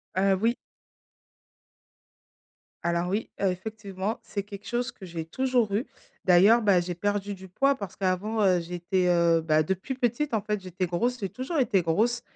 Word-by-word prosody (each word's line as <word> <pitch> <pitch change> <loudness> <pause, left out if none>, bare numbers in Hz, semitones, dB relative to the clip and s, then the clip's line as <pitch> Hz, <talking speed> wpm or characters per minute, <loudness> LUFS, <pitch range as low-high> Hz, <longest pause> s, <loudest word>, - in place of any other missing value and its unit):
Heu, 190 0 +3
oui. 230 +2 +2 2.3
Alors 170 +1 0
oui, 210 +4 -2
heu, 200 - +3
effectivement, 200 +1 -4
c'est 200 -2 -4
quelque 205 0 -10
chose 240 +1 -1
que 190 - -12
j'ai 165 -2 -5
toujours 245 +2 0
eu, 225 +6 0 0.4
d'ailleurs, 195 +6 +6
bah, 200 -4 +4
j'ai 175 0 -3
perdu 205 +2 -1
du 190 -1 -10
poids 275 +10 +2
parce 200 -7 -7
qu'avant, 195 +4 0
heu, 185 -2 +4
j'étais, 180 +2 -1
heu, 170 -1 +4
bah, 155 -1 +3
depuis 190 - -3
petite, 250 +3 -1
en 220 - +2
fait, 210 -1 -2
j'étais 185 0 -3
grosse, 235 +9 -1
j'ai 195 -4 -3
toujours 260 - -4
été 210 -7 +3
grosse 220 +9 +1
195 Hz, 170 wpm, -27 LUFS, 180-225 Hz, 2.3 s, d'ailleurs